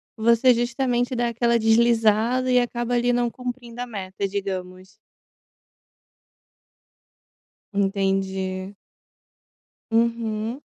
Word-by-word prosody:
você 235 Hz, +3 st, +4 dB
justamente, 245 Hz, +1 st, -1 dB
dá 240 Hz, 0 st, 0 dB
aquela 235 Hz, 0 st, +1 dB
deslizada, 230 Hz, +2 st, +3 dB
e 250 Hz, -, +5 dB
acaba 240 Hz, 0 st, -2 dB
ali, 245 Hz, 0 st, +2 dB
não 240 Hz, 0 st, +1 dB
cumprindo 245 Hz, -1 st, -7 dB
a 250 Hz, -, -4 dB
meta, 195 Hz, -2 st, -4 dB
digamos. 190 Hz, -1 st, -5 dB, 2.8 s
Entendi. 195 Hz, -1 st, -1 dB, 1.2 s
Uhum. 230 Hz, +2 st, 0 dB
230 Hz, 85 wpm, -23 LUFS, 200-240 Hz, 2.8 s, e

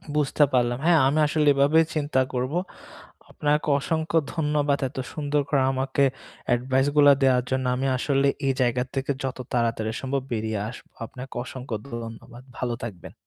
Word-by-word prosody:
বুঝতে 150 Hz, 0 st, +2 dB
পারলাম। 120 Hz, -1 st, +2 dB
হ্যাঁ, 170 Hz, -2 st, +5 dB
আমি 150 Hz, +3 st, +1 dB
আসলে 150 Hz, 0 st, +1 dB
এভাবেই 145 Hz, +4 st, +4 dB
চিন্তা 145 Hz, -3 st, +1 dB
করব। 125 Hz, +3 st, -2 dB, 0.8 s
আপনাকে 150 Hz, +1 st, 0 dB
অসংখ্য 160 Hz, +3 st, -1 dB, 0.2 s
ধন্যবাদ 150 Hz, -2 st, +1 dB
এত 135 Hz, -, -16 dB, 0.2 s
সুন্দর 145 Hz, -1 st, 0 dB
করে 140 Hz, -2 st, +2 dB
আমাকে 135 Hz, +1 st, 0 dB, 0.5 s
advice 130 Hz, +3 st, +1 dB
গুলা 145 Hz, -1 st, +8 dB
দেয়ার 125 Hz, -2 st, +4 dB
জন্য। 130 Hz, 0 st, -1 dB
আমি 135 Hz, +2 st, -1 dB
আসলে 140 Hz, +1 st, +1 dB, 0.2 s
এই 135 Hz, -, +3 dB
জায়গার 125 Hz, +1 st, +1 dB
থেকে 135 Hz, +1 st, -1 dB
যত 130 Hz, -1 st, -3 dB, 0.2 s
তাড়াতাড়ি 115 Hz, -2 st, 0 dB
সম্ভব 135 Hz, 0 st, -1 dB
বেরিয়ে 110 Hz, -1 st, -2 dB
আসবো। 125 Hz, -, -12 dB, 0.2 s
আপনাকে 125 Hz, +3 st, -10 dB
অসংখ্য 125 Hz, -3 st, -6 dB, 0.2 s
ধন্যবাদ। 115 Hz, +1 st, -8 dB
ভালো 120 Hz, -1 st, -2 dB
থাকবেন। 95 Hz, -7 st, -8 dB
135 Hz, 155 wpm, -25 LUFS, 125-145 Hz, 0.8 s, গুলা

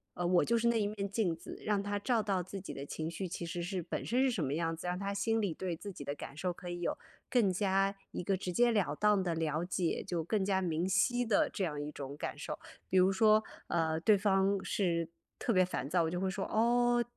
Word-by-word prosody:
呃， 175 Hz, -, -1 dB
我 180 Hz, 0 st, +4 dB
就 235 Hz, -, +2 dB
是 235 Hz, +1 st, +2 dB
那 235 Hz, -1 st, +3 dB
一 -, -, +1 dB
面 205 Hz, -1 st, -3 dB
镜 200 Hz, -4 st, +1 dB
子， 165 Hz, -, -9 dB
让 205 Hz, -2 st, +1 dB
他 205 Hz, 0 st, -2 dB
照 230 Hz, +2 st, +1 dB
到 195 Hz, -4 st, 0 dB
自 195 Hz, +3 st, -7 dB
己 190 Hz, -, -7 dB
的 140 Hz, -, -6 dB
情 160 Hz, +2 st, -4 dB
绪， 180 Hz, +2 st, -4 dB
其 170 Hz, -, -4 dB
实 170 Hz, +1 st, -4 dB
是 180 Hz, 0 st, -2 dB
本 -, -, -4 dB
身 245 Hz, +3 st, +2 dB
是 265 Hz, -, +4 dB
什 215 Hz, -10 st, -1 dB
么 140 Hz, +1 st, -1 dB
样 165 Hz, 0 st, -1 dB
子， 165 Hz, +2 st, -7 dB
让 180 Hz, +1 st, -1 dB
他 200 Hz, 0 st, -2 dB
心 225 Hz, +3 st, +1 dB
里 200 Hz, -6 st, 0 dB
对 175 Hz, 0 st, -3 dB
自 200 Hz, +3 st, -7 dB
己 145 Hz, -, -8 dB
的 140 Hz, -, -3 dB
感 140 Hz, -1 st, -8 dB
受 180 Hz, +4 st, -1 dB
可 175 Hz, +1 st, -9 dB
以 175 Hz, 0 st, -4 dB
有 -, -, -1 dB, 0.3 s
更 235 Hz, -6 st, +4 dB
加 195 Hz, +1 st, +2 dB, 0.2 s
一 -, -, -4 dB
个 195 Hz, +2 st, +1 dB
直 185 Hz, -1 st, -4 dB
接 240 Hz, +6 st, +4 dB
了 200 Hz, -10 st, +1 dB
当 210 Hz, +1 st, +3 dB
的 175 Hz, -2 st, 0 dB
了 160 Hz, 0 st, -1 dB
解， 175 Hz, -1 st, -1 dB
就 175 Hz, -2 st, -1 dB
更 205 Hz, +2 st, +1 dB
加 190 Hz, -1 st, +1 dB
明 170 Hz, -1 st, 0 dB
晰 245 Hz, +6 st, +2 dB
的 220 Hz, -3 st, +3 dB
这 195 Hz, -, -3 dB
样 150 Hz, -4 st, -2 dB
一 145 Hz, -, -4 dB
种 140 Hz, -1 st, -7 dB
感 -, -, -4 dB
受。 -, -, -5 dB, 0.3 s
比 190 Hz, -, +2 dB
如 185 Hz, +1 st, +5 dB
说， 215 Hz, +1 st, +5 dB, 0.2 s
呃， 160 Hz, -2 st, +1 dB
对 210 Hz, +4 st, +5 dB
方 195 Hz, 0 st, +2 dB
是 170 Hz, -4 st, 0 dB, 0.3 s
特 -, -, -1 dB
别 185 Hz, -4 st, +5 dB
烦 140 Hz, -6 st, -4 dB
躁， 175 Hz, +2 st, +3 dB
我 160 Hz, -, 0 dB
就 180 Hz, -, -3 dB
会 190 Hz, 0 st, 0 dB
说： 190 Hz, +1 st, -3 dB
“哦， 240 Hz, +2 st, +3 dB
190 Hz, 280 characters per minute, -33 LUFS, 170-205 Hz, 0.3 s, 如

